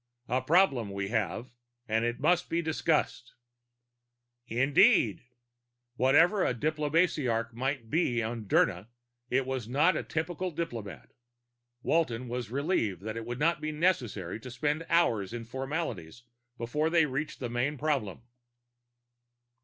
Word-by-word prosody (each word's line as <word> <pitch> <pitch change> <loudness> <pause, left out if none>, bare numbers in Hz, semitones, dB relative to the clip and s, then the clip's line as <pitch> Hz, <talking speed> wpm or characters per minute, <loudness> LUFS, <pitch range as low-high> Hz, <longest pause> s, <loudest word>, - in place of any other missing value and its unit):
A 130 +1 0
problem 135 - +3
we 100 0 -4
have, 115 +2 -2 0.4
and 110 +1 +1
it 120 0 -1
must 175 +4 +2
be 170 - 0
discussed." 155 -6 -1 1.1
"Agreed." 140 - +4 0.7
Whatever 155 - +4
a 125 - +1
diplomasiarch 150 -5 0
might 130 -1 -3
be 125 -8 +1
on 115 0 -4
Dirna, 95 0 +2 0.4
it 135 +1 +1
was 130 -4 -3
not 150 +8 +3
a - - -1
typical 175 +3 -3
diplomat. 115 - -6 0.7
Walton 125 -7 0
was 120 -2 -4
relieved 125 - -1
that 110 +1 -4
it 115 0 -6
would 120 0 -4
not 160 +2 +1
be 155 0 -2
necessary 125 - -1
to 125 - -9
spend 145 +6 -2
hours 115 - +2
in 120 -1 -5
formalities 125 - -4 0.3
before 150 +7 -1
they 165 -1 +4
reached 145 +2 -4
the 125 - -3
main 125 +5 -1
problem. 135 -8 -1
130 Hz, 130 wpm, -29 LUFS, 115-155 Hz, 1.1 s, Agreed